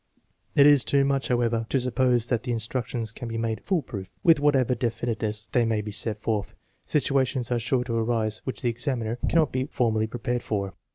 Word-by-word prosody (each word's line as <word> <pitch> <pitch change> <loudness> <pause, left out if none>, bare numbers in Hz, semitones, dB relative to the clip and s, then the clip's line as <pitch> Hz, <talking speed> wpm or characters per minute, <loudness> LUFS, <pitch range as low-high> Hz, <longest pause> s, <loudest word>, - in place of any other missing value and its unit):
It 140 - +7
is 145 -3 +7
too 140 -1 +2
much, 135 -1 0
however, 115 -2 0
to 135 - +2
suppose 125 -1 +1
that 120 -3 +1
the 125 - -4
instructions 115 0 -2
can 120 +2 -7
be 115 0 -4
made 115 -1 -2
" - - -33
fool 185 -6 0
proof." 95 -3 -7
With 165 -3 +6
whatever 135 -4 +3
definiteness 115 -2 -2
they 125 -4 +3
may 110 -2 0
be 105 0 -6
set 105 +1 0
forth, 105 -1 -2 0.3
situations 130 -4 0
are 120 - +2
sure 125 +2 0
to 115 -2 -2
arise 110 -2 0
which 130 - -5
the 120 - +2
examiner 120 -2 -3
cannot 160 -4 +3
be 130 +1 -1
formally 110 -5 0
prepared 120 +1 -3
for. 100 -3 -3
120 Hz, 205 wpm, -26 LUFS, 110-130 Hz, 0.3 s, It